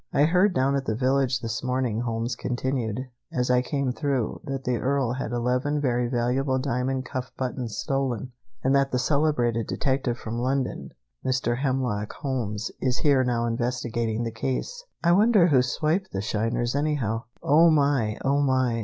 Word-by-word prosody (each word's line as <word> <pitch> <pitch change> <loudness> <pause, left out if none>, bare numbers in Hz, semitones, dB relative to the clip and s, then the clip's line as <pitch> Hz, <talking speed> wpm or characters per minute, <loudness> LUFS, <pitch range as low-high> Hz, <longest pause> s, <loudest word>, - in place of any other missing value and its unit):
"I 145 - +3
heard 180 +5 +3
down 135 +2 +2
at 135 -1 -1
the 110 - -1
village 130 0 +1
this 115 -1 -3
morning," 125 -3 0
Holmes 115 0 -2
continued, 125 -2 -2 0.3
"as 125 0 0
I 125 0 +4
came 140 0 -1
through, 135 -3 -2
that 135 -2 -4
the 125 -1 0
Earl 135 -1 0
had 130 -2 -4
eleven 125 +5 0
very 125 -3 +1
valuable 130 +2 0
diamond 130 0 -1
cuff 125 0 -5
buttons 125 -4 -3
stolen, 130 -3 -2 0.3
and 135 - +3
that 140 0 +2
the 125 - +1
celebrated 125 -5 +1
detective 130 -3 -1
from 115 +1 -5
London, 130 +1 -1 0.3
Mr. 125 -2 0
Hemlock 130 -6 -1
Holmes, 115 -6 -3
is 130 0 +1
here 140 -3 +3
now 120 -2 0
investigating 120 -1 -1
the 115 - -2
case. 130 - -3 0.2
I 170 - +4
wonder 200 -1 +5
who 135 -4 +5
swiped 155 +9 0
the 95 - -2
shiners, 115 +3 -1
anyhow." 140 -7 -1 0.2
"Oh, 160 +4 +6
my! 140 -8 +2
Oh, 140 +1 +3
my!" 130 -4 +2
130 Hz, 165 wpm, -26 LUFS, 120-140 Hz, 0.3 s, Oh